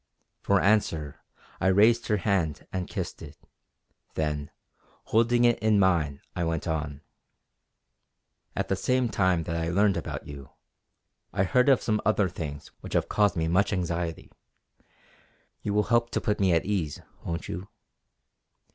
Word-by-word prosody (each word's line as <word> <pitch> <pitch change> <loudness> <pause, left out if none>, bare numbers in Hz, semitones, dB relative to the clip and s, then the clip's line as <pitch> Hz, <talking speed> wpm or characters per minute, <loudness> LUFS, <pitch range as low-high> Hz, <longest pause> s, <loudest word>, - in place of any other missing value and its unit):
For 100 -1 +3
answer 85 -9 +1 0.4
I 95 - +1
raised 110 +5 +4
her 105 - +2
hand 85 -6 0
and 95 -1 -2
kissed - - -5
it; - - -10 0.8
then 75 -2 -2 0.5
holding 120 +2 +3
it 120 -1 +3
in 110 -1 +3
mine 85 -7 +2
I 85 - -1
went 80 -1 -2
on: 75 -3 -3 1.5
"At - - -1
the - - +1
same 125 -1 +1
time 95 -5 +2
that 85 +1 -3
I 80 0 -1
learned 100 +2 +3
about - - -5
you, 70 -1 -9 0.8
I 95 - +1
heard 125 +8 +3
of 130 -5 +4
some 105 -1 +1
other 105 -3 +2
things 75 -4 -6
which - - -8
have - - +1
caused 105 -1 +2
me 80 -1 0
much 90 +5 +2
anxiety. 85 -3 -3 1.3
You 105 - -2
will 105 - +4
help 120 0 +3
to - - +1
put 105 - 0
me 95 -2 +3
at 85 -1 +2
ease, 90 -8 -2 0.2
won't 85 0 -4
you?" 90 +3 -5
95 Hz, 155 wpm, -27 LUFS, 80-105 Hz, 1.5 s, raised